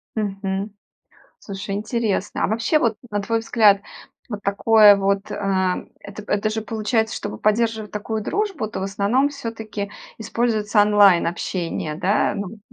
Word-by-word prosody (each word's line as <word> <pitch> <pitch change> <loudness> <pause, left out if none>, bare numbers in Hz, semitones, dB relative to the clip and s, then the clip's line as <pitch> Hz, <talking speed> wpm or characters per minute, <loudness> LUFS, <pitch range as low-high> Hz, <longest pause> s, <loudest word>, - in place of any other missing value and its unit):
Мгм. 195 -1 -3 0.7
Слушай, 195 0 -6
интересно. 215 -1 -2
А - - +3
вообще 230 +8 +1
вот, 225 -6 0
на 205 -1 -2
твой 230 +3 0
взгляд, 215 -3 +4 0.5
вот 210 -3 -5
такое 205 +1 +6
вот 200 +1 0
э, - - -3 0.7
эт 200 +1 -10
это 210 +1 0
же 220 0 -3
получается, 220 +1 -1
чтобы 205 - -5
поддерживать 220 0 0
такую 215 +1 -3
дружбу, 390 - -2
то 210 - -6
в 190 - -3
основном 205 +8 +1
всё-таки 225 -7 -6 0.3
используется 220 -2 +1
онлайн-общение, 180 -5 +2
да? 195 +5 +1
Ну, 200 -1 -4
вот, 215 0 -12
210 Hz, 140 wpm, -22 LUFS, 200-225 Hz, 0.7 s, такое